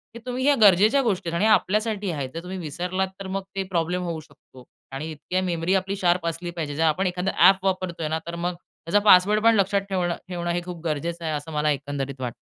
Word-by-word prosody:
हे - - -7
तुम्ही, 255 +1 -3
ह्या 290 0 +5
गरजेच्या 210 +7 +6
गोष्टी 200 -8 -1
आहेत 170 - -3
आणि 190 - +1
हे 220 - +4
आपल्यासाठी 210 -1 +1
आहेत. 140 -4 -4
जर 165 +1 -6
तुम्ही 185 +1 -6
विसरलात 180 +3 -2
तर 195 - -6
मग 195 - -5
ते 195 - -1
प्रॉब्लेम 175 +2 0
होऊ 170 -2 -3
शकतो. 130 -4 -17 0.3
आणि 140 +4 -5
इतकी 180 +5 -3
मेमरी 175 0 -1
आपली 190 +1 -1
शार्प 175 -3 +1
असली 170 +1 -4
पाहिजे. 155 -4 -4
जर 160 - 0
आपण 165 +4 +2
एखादा 180 +1 -1 0.2
ॲप 190 0 +3
वापरतोय 185 -4 -1
ना 160 +1 -1
तर 170 - -4
मग 175 +1 -2
त्याचा 170 +2 -2
पासवर्ड 210 +2 +6
पण 230 0 +6
लक्षात 200 0 +2
ठेवणं 180 -3 0
ठेवणं 175 -1 -3
हे 175 0 -1
खूप 175 -2 -7
गरजेचं 165 +2 -3
आहे, 155 - -1
असं 150 +2 -5
मला 150 0 +1
एकंदरीत 140 -1 -4
वाटतं. 120 -2 -3
175 Hz, 230 wpm, -24 LUFS, 160-190 Hz, 0.3 s, गरजेच्या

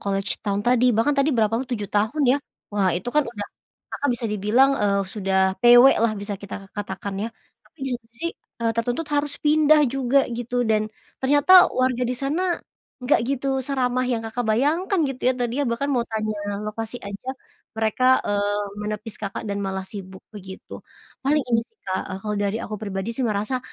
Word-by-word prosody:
college 195 0 -2
town 200 -1 -1
tadi, 250 0 +4
bahkan 285 +6 +3
tadi 275 +2 +3
berapa 220 0 +2
t - - -1
7 210 -4 -3
tahun 220 +9 +1
ya. - - +3 0.4
Wah 200 -2 +2
itu 210 - -4
kan 300 - +5
udah 205 -3 -6 0.4
Kakak 285 - -2
bisa 230 -1 -3
dibilang, 210 +7 +3
eee, 200 -1 +2
sudah 190 -1 +1
PW 240 +1 +8
lah 225 -1 +2
bisa 205 0 -4
kita 200 - -7 0.2
katakan 200 0 -5
ya. - - -4 0.4
Tapi - - -29
di - - -2
situ 225 - -31 0.2
sih, 335 - 0 0.3
eee, 230 - +2
tertuntut 245 +7 -1
harus 290 0 0
pindah 305 0 +5
juga 270 0 +3
gitu 245 +1 -2
dan, 215 -1 +1 0.3
ternyata 290 +7 +7
warga 255 -1 +1
di 250 - -1
sana, 320 +8 0 0.5
nggak 250 - +3
gitu 275 0 -1 0.2
seramah 255 -2 0
yang 235 -3 -1
Kakak 235 +2 -3
bayangkan 310 - +1
gitu 265 -1 -6
ya. 255 - +4
Tadinya 245 +3 -1
bahkan 235 +5 -1
mau 245 -3 +1
tanya, 215 -1 -2 0.3
lokasi 225 +2 -5
aja, 200 +5 -8 0.5
mereka, 220 +3 0 0.2
eee, 205 0 0 0.2
menepis 210 +1 -4
Kakak 200 -2 -5
dan 200 -3 -3
malah 190 -1 -3
sibuk 190 -1 -9
begitu. 190 -3 -10 0.5
Paling 295 +2 +3
ini 230 -1 +4
sih - - -40
Kak, 190 0 -2
eee, 190 - -5
kalau 210 -1 -2
dari 205 +1 0
aku 215 - -5
pribadi 200 0 -4
sih 245 +1 -1
merasa, 215 +4 -1
230 Hz, 185 wpm, -23 LUFS, 205-265 Hz, 0.5 s, PW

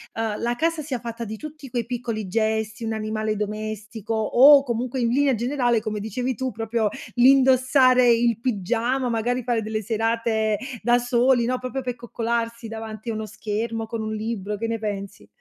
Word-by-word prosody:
uhm, 225 -2 -2
la 240 +1 0
casa 330 +2 0
sia 270 -5 -4
fatta 235 0 -6
di 220 0 -6
tutti 305 -2 -9
quei 235 -2 -2
piccoli 235 -4 -4
gesti, 220 +2 -1
un 225 0 -2
animale 215 0 -2
domestico 215 +1 -4
o 275 +6 +7
comunque 250 +1 -2
in 230 - +2
linea 275 0 +3
generale, 240 -1 +1
come 215 -1 -3
dicevi 245 +5 -2
tu, 260 +3 -3
proprio 225 -1 -1 0.3
l'indossare 255 0 +5
il 235 -1 +2
pigiama, 240 +3 0
magari 240 +2 -1
fare 235 -2 0
delle 215 0 -3
serate 225 0 0 0.2
da 240 0 +4
soli, 245 0 +2
no, 250 +1 -1
proprio 255 +1 -4
per 250 -1 -3
coccolarsi 235 -1 -3
davanti 220 0 -6
a - - -1
uno 215 0 -4
schermo 225 +2 -3
con 225 0 -4
un 215 0 -3
libro, 210 -2 -3
che 230 - -3
ne 225 -1 -2
pensi? 200 - -5
230 Hz, 175 wpm, -24 LUFS, 220-245 Hz, 0.3 s, o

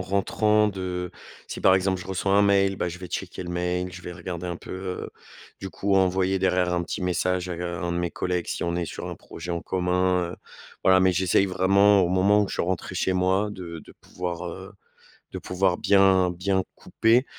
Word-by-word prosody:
rentrant 105 +3 +2
de 90 -3 -4 0.3
si, - - -7
par 95 0 +6
exemple, 95 0 0
je 95 - -10
reçois 95 +1 -1
un 100 +1 +5
mail, 100 -1 +3
bah, 90 - -2
je 85 +1 -7
vais 90 - -7
checker 90 - -5
le 85 - -6
mail, 90 +1 -2
je 90 0 -10
vais 90 - -7
regarder 90 0 -6
un 85 - -3
peu, - - -10
heu, 95 -1 -5 0.5
du 95 -1 -6
coup, 100 0 -1
envoyer 95 0 +2
derrière 90 -1 +2
un 85 - 0
petit 90 - -5
message, 90 0 0
à 90 - -3
g 90 - -5
un 85 0 -3
de 85 - -1
mes 85 -1 -1
collègues, 90 -1 -2
si - - -2
on 85 0 -1
est 85 0 -1
sur - - -6
un - - -5
projet 85 +1 -8
en 85 - -2
commun. 90 -1 0
Heu - - -10 0.5
voilà, 95 0 +6
mais 95 0 +4
j'essaye 95 +2 +2
vraiment 100 +2 +4
au 90 - +2
moment 100 +3 +4
où 100 - -2
je - - -4
suis - - 0
rentré 90 +1 -3
chez 95 - +1
moi, 95 +3 +1
de 85 -3 -7
de - - -14
pouvoir, 90 -1 -5
heu, 95 +3 -9 0.6
de - - -5
pouvoir 90 -1 0
bien 95 -2 +4
bien 95 +1 0
couper 115 +4 +2
90 Hz, 220 wpm, -25 LUFS, 90-95 Hz, 0.6 s, par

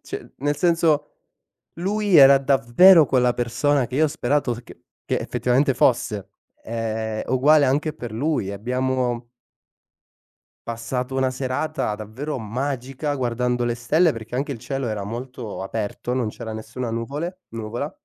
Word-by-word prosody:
ci - - -8
nel 145 +2 0
senso: 165 -3 +2 0.6
lui 200 +2 +1
era 140 -1 +9
davvero 140 +6 +6
quella 125 -2 +3
persona 125 +3 +1
che 125 - -9
io 155 - +4
ho - - -1
sperato 145 -3 0
che - - -15 0.2
che - - 0
effettivamente 125 +3 +1
fosse; 105 -7 +1 0.3
è 110 -1 -3
uguale 145 +4 +5
anche 145 +4 +1
per 120 -7 -8
lui. 130 -4 -1
Abbiamo 125 +2 -1 1.4
passato 125 +3 -3
una 130 -1 +1
serata 130 -1 -2
davvero 115 +8 -5
magica, 130 +5 -3
guardando 125 -1 -1
le 120 0 0
stelle 155 +8 +2
perché 115 0 -8
anche 140 +2 -1
il 120 - -7
cielo 135 +2 -3
era 105 -2 -3
molto 120 0 -6
aperto, 105 +4 -4
non 125 -3 0
c'era 110 +1 -7
nessuna 115 +2 -5
nuvole 145 +11 -4
nuvola. 115 +6 -4
125 Hz, 140 wpm, -23 LUFS, 115-145 Hz, 1.4 s, era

